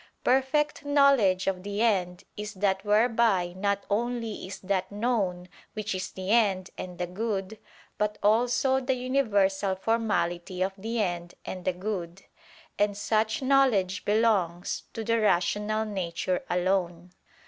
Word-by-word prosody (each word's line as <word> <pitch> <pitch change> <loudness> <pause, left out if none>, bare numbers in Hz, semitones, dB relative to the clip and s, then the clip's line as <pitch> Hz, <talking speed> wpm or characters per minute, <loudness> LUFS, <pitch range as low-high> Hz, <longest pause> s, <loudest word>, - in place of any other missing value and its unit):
Perfect 270 +4 +1
knowledge 275 -10 +4
of 190 -1 -1
the 205 +3 -2
end, 180 -6 +1
is 210 0 -6
that 190 0 0
whereby 210 -4 +2
not 200 +1 -1
only 230 -1 -2
is 190 - -7
that 190 0 -1
known 200 -5 -1 0.3
which 215 -1 -3
is 185 0 -3
the 190 +1 -4
end 195 -5 +2
and 180 -1 -7
the 180 - -1
good, 200 +2 -3 0.4
but 210 0 0
also 245 +5 +3
the 265 0 0
universal 205 -7 +1
formality 185 -4 -1
of 190 +1 -2
the 225 +4 -3
end 175 -4 -2
and 185 -1 -6
the 185 - +1
good; 185 -1 -5 0.6
and 205 -1 +1
such 215 +3 0
knowledge 250 -9 +3
belongs 200 -5 +1
to 225 - -4
the 230 +1 +1
rational 210 +3 +1
nature 185 -3 -2
alone. 180 -1 -1
205 Hz, 135 wpm, -27 LUFS, 185-225 Hz, 0.6 s, knowledge